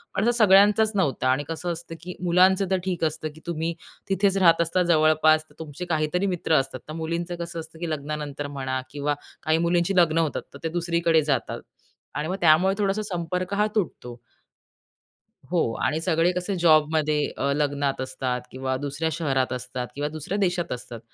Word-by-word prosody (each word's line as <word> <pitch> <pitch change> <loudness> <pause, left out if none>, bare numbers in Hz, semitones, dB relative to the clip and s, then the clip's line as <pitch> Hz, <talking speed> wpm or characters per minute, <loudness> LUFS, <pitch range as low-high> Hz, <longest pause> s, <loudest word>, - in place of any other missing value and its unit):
पण 200 - +1
आता 235 - +4
सगळ्यांचाच 210 +1 +5
नव्हता 140 -9 +1
आणि 135 +3 0
कसं 170 +2 -3
असतं 165 0 -8
की 180 +1 -7
मुलांचं 185 +2 +4
तर 190 - +3
ठीक 180 -3 -2
असतं 155 0 -2
की 160 - -15
तुम्ही 165 0 -2 0.4
तिथेच 195 0 +2
राहत 170 -3 +5
असता 170 +2 +1
जवळपास 155 0 +4
तर - - -21
तुमचे 160 +2 -7
काहीतरी 155 +5 0
मित्र 165 - -1
असतात. 135 -1 -4
तर 155 - -6
मुलींचं 170 +2 -3
कसं 170 0 -6
असतं 160 0 -10
की 170 -1 -3
लग्नानंतर 145 -1 -4
म्हणा 130 -1 -2
किंवा 145 0 -1 0.3
काही 160 0 +2
मुलींची 175 +2 +1
लग्न 165 -2 +4
होतात, 160 -3 0
तर 140 - -10
ते 165 - -1
दुसरीकडे 170 -1 +2
जातात 145 -4 -1 0.6
आणि 150 +1 -2
मग 185 - -2
त्यामुळे 175 +4 +5
थोडासा 200 +1 +1
संपर्क 180 +2 -3
हा 210 +1 +2
तुटतो. 125 - -3 1.3
हो. 170 -10 +1
आणि 155 - 0
सगळे 165 0 +2
कसे 180 +2 -2
जॉबमध्ये 155 -2 +3 0.2
अ, 140 +1 0
लग्नात 145 -2 0
असतात 130 -1 -2
किंवा 130 0 -2
दुसऱ्या 145 +4 -2
शहरात 135 -5 0
असतात 125 0 -4
किंवा 145 +1 -2
दुसऱ्या 155 +6 -4
देशात 175 -3 0
असतात. 120 -2 -7
160 Hz, 175 wpm, -25 LUFS, 145-180 Hz, 1.3 s, सगळ्यांचाच